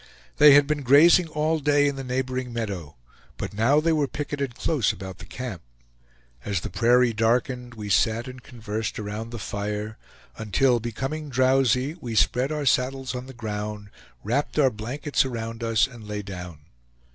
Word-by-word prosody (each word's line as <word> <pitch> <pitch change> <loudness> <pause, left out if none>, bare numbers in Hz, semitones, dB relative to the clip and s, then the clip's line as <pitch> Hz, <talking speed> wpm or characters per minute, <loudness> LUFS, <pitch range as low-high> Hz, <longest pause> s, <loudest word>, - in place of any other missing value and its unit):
They 150 -1 +8
had 145 0 +6
been 150 0 -1
grazing 155 +7 +6
all 155 +1 0
day 145 0 +3
in 140 - -1
the 135 - -6
neighboring 130 0 -3
meadow, 100 -10 -5 0.4
but - - -5
now 120 +8 +3
they 165 +1 +2
were 150 -3 +1
picketed 140 -3 -4
close 130 -3 +1
about 95 -1 -9
the - - -10
camp. 120 -9 -6 0.8
As 100 -5 -2
the - - -6
prairie 120 0 +3
darkened 120 +2 0
we 105 -2 -7
sat 115 +4 +2
and 130 0 -9
conversed 110 -3 -5
around 105 +2 -5
the 120 - -6
fire, 105 +1 -4 0.4
until 120 +4 +2
becoming 135 +7 -4
drowsy 130 +1 +2
we 120 -4 -5
spread 125 +5 +2
our 150 -2 -2
saddles 130 0 +1
on 125 +1 -6
the 135 - -10
ground, 105 -2 -5 0.3
wrapped 130 +9 -1
our 135 -4 +4
blankets 130 +8 -1
around 115 -2 -5
us 115 0 +3
and 120 -5 -11
lay 105 0 -4
down. 90 -5 -8
125 Hz, 170 wpm, -25 LUFS, 110-135 Hz, 0.8 s, They